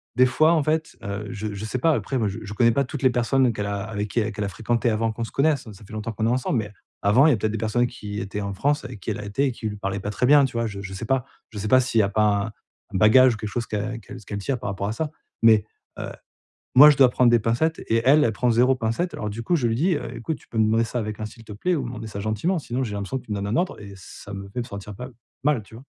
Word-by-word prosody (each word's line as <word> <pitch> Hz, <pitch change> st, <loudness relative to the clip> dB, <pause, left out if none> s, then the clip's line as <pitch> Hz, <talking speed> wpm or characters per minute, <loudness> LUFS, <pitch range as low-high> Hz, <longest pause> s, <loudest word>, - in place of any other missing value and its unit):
des 130 Hz, -, +6 dB
fois 155 Hz, +6 st, +4 dB
en 160 Hz, -3 st, +2 dB
fait, 155 Hz, +2 st, -1 dB
heu 100 Hz, +1 st, -4 dB
je 105 Hz, 0 st, -4 dB
je 100 Hz, +2 st, -5 dB
sais 110 Hz, -, -3 dB
pas 160 Hz, +5 st, +3 dB
après 135 Hz, -2 st, -2 dB
moi 110 Hz, -, +1 dB
je 95 Hz, -, -6 dB
je 100 Hz, 0 st, -7 dB
connais 115 Hz, +2 st, +4 dB
pas 140 Hz, +2 st, +1 dB
toutes 140 Hz, +2 st, -6 dB
les 130 Hz, -, +6 dB
personnes 125 Hz, +1 st, +2 dB
qu'elle 105 Hz, -1 st, -3 dB
a 100 Hz, -1 st, -3 dB
avec 105 Hz, 0 st, -4 dB
qui 110 Hz, 0 st, 0 dB
qu'elle 105 Hz, 0 st, -3 dB
a 100 Hz, -, -3 dB
fréquentées 115 Hz, +5 st, 0 dB
avant 110 Hz, +1 st, 0 dB
qu'on 115 Hz, +1 st, -3 dB
se -, -, -11 dB
connaisse, 140 Hz, -3 st, +1 dB
ça 100 Hz, +1 st, -14 dB
fait -, -, -16 dB
longtemps 110 Hz, +1 st, -4 dB
qu'on 110 Hz, +1 st, -2 dB
est -, -, +2 dB
ensemble. 125 Hz, -1 st, 0 dB
Mais 105 Hz, -1 st, -5 dB, 0.3 s
avant, 115 Hz, +9 st, +5 dB
il -, -, +6 dB
y -, -, +4 dB
a 115 Hz, -, +1 dB
peut-être 110 Hz, +1 st, -1 dB
des -, -, -1 dB
personnes 115 Hz, +3 st, +1 dB
qui 105 Hz, -2 st, -6 dB
étaient 100 Hz, +1 st, -5 dB
en 100 Hz, 0 st, -3 dB
France 145 Hz, +8 st, 0 dB
avec 120 Hz, -5 st, -8 dB
qui, -, -, -3 dB
elle -, -, -4 dB
a 105 Hz, -, -6 dB
été 100 Hz, +8 st, 0 dB
et -, -, 0 dB
qui 115 Hz, -, -5 dB
lui 105 Hz, -, -6 dB
parlaient 100 Hz, 0 st, -3 dB
pas 105 Hz, -, -3 dB
très 125 Hz, -, 0 dB
bien, 145 Hz, 0 st, +7 dB
tu 135 Hz, -, -5 dB
vois? 115 Hz, 0 st, 0 dB
Je 100 Hz, -2 st, -7 dB
je 95 Hz, -1 st, -7 dB
sais 95 Hz, -, -6 dB
pas 135 Hz, -2 st, 0 dB, 0.3 s
je 105 Hz, -, -6 dB
sais 105 Hz, -, -3 dB
pas 130 Hz, -, +6 dB
s'il 120 Hz, -3 st, 0 dB
y -, -, +5 dB
a -, -, +2 dB
pas 105 Hz, +1 st, +1 dB, 0.2 s
un -, -, -5 dB, 0.5 s
un -, -, +3 dB
bagage 120 Hz, +5 st, +6 dB
ou -, -, -9 dB
quelque 105 Hz, -1 st, -5 dB
chose 115 Hz, +2 st, -3 dB
qu'elle 110 Hz, +2 st, -3 dB
qu'elle 125 Hz, -, -10 dB
ce -, -, -18 dB
qu'elle 100 Hz, -, -5 dB
tient 130 Hz, +7 st, -1 dB
par 110 Hz, -, -5 dB
rapport 100 Hz, +1 st, -3 dB
à 110 Hz, -, -2 dB
ça, 155 Hz, +5 st, -3 dB, 0.3 s
mais 110 Hz, -2 st, +6 dB, 0.3 s
heu, -, -, -4 dB, 0.7 s
moi, 150 Hz, +3 st, +11 dB
je 145 Hz, -, +3 dB
dois 135 Hz, -2 st, +8 dB
prendre 125 Hz, -1 st, +4 dB
des 120 Hz, -, +5 dB
pincettes 120 Hz, +10 st, 0 dB
et 115 Hz, 0 st, +2 dB
elle, 145 Hz, +3 st, +6 dB
elle 115 Hz, -, +2 dB
prend 125 Hz, +3 st, +1 dB
0 125 Hz, +3 st, +4 dB
pincettes 125 Hz, +9 st, -2 dB
alors 105 Hz, -, -3 dB
du 110 Hz, +3 st, -5 dB
coup 175 Hz, +9 st, +1 dB
je 130 Hz, -7 st, 0 dB
lui 115 Hz, -, 0 dB
dis: 170 Hz, +8 st, +2 dB
«Heu -, -, -6 dB
écoute, 150 Hz, +7 st, -3 dB
tu -, -, -23 dB
peux 115 Hz, -, -5 dB
me 110 Hz, -, +5 dB
demander 110 Hz, +2 st, +2 dB
ça 115 Hz, +2 st, -3 dB
avec 110 Hz, -2 st, -4 dB
un, 110 Hz, -, -2 dB
s'il 115 Hz, +2 st, -13 dB
te 110 Hz, -, -10 dB
plaît 175 Hz, -, 0 dB
ou 140 Hz, -, -2 dB
demander 115 Hz, -2 st, -6 dB
ça 100 Hz, -1 st, -6 dB
gentiment 110 Hz, -, 0 dB
sinon 130 Hz, -3 st, -3 dB
j'ai 110 Hz, -, -5 dB
l'impression 100 Hz, +6 st, -3 dB
que -, -, -14 dB
tu -, -, -15 dB
me 105 Hz, -, -1 dB
donnes 100 Hz, -, -3 dB
un 105 Hz, -, 0 dB
ordre 175 Hz, -6 st, -1 dB
et 100 Hz, -1 st, -10 dB
ça 100 Hz, +2 st, -10 dB
me 100 Hz, 0 st, -7 dB
fait 110 Hz, -, -7 dB
me -, -, -3 dB
sentir, 100 Hz, -2 st, -8 dB
pas, 125 Hz, +4 st, -7 dB, 0.4 s
mal, 145 Hz, -6 st, +2 dB
tu 105 Hz, -, -17 dB
vois?» 125 Hz, -, -13 dB
115 Hz, 330 wpm, -24 LUFS, 105-130 Hz, 0.7 s, moi